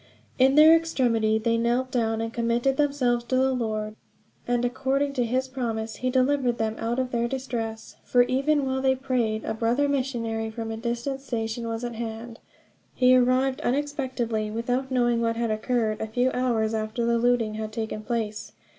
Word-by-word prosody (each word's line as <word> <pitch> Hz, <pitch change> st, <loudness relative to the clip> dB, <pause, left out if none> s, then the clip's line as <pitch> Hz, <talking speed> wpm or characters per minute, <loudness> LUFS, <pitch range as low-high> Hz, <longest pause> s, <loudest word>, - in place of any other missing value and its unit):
In 265 Hz, +1 st, +5 dB
their 310 Hz, +2 st, +8 dB
extremity, 240 Hz, -9 st, +1 dB
they 230 Hz, +1 st, +1 dB
knelt 245 Hz, +2 st, 0 dB
down 225 Hz, -2 st, 0 dB
and 225 Hz, 0 st, -4 dB
committed 235 Hz, +3 st, +1 dB
themselves 270 Hz, -5 st, +1 dB
to 255 Hz, -, -1 dB
the 265 Hz, +1 st, +3 dB
Lord. 215 Hz, -3 st, -2 dB, 0.5 s
And 245 Hz, 0 st, +1 dB
according 270 Hz, +3 st, 0 dB
to 250 Hz, -3 st, 0 dB
his 260 Hz, +3 st, 0 dB
promise 230 Hz, -4 st, -4 dB
he 255 Hz, -, -1 dB
delivered 255 Hz, -1 st, +2 dB
them 220 Hz, 0 st, -1 dB
out 235 Hz, +2 st, -1 dB
of 255 Hz, -1 st, -1 dB
their 235 Hz, 0 st, 0 dB
distresses; 230 Hz, -4 st, -5 dB
for 245 Hz, -1 st, +4 dB
even 275 Hz, +3 st, +1 dB
while 265 Hz, 0 st, -1 dB
they 265 Hz, 0 st, +3 dB
prayed 250 Hz, -5 st, -1 dB
a -, -, -1 dB
brother 235 Hz, +6 st, +1 dB
missionary 235 Hz, -5 st, -2 dB
from 225 Hz, 0 st, -5 dB
a 220 Hz, -, -4 dB
distant 240 Hz, +4 st, -3 dB
station 230 Hz, -2 st, -3 dB
was 225 Hz, +1 st, -4 dB
at 240 Hz, -1 st, -3 dB
hand. 225 Hz, 0 st, -6 dB, 0.6 s
He 255 Hz, 0 st, +5 dB
arrived 255 Hz, +1 st, +2 dB
unexpectedly, 255 Hz, -5 st, -1 dB
without 245 Hz, +4 st, -2 dB
knowing 240 Hz, -2 st, +2 dB
what 230 Hz, 0 st, 0 dB
had 230 Hz, -1 st, -1 dB
occurred, 220 Hz, 0 st, -1 dB
a 220 Hz, -, -2 dB
few 245 Hz, +4 st, +1 dB
hours 230 Hz, -3 st, 0 dB
after 220 Hz, +2 st, -2 dB
the 235 Hz, 0 st, +2 dB
looting 240 Hz, -2 st, +2 dB
had 215 Hz, 0 st, -5 dB
taken 220 Hz, -1 st, -4 dB
place. 215 Hz, -2 st, -4 dB
240 Hz, 180 wpm, -25 LUFS, 225-260 Hz, 0.6 s, their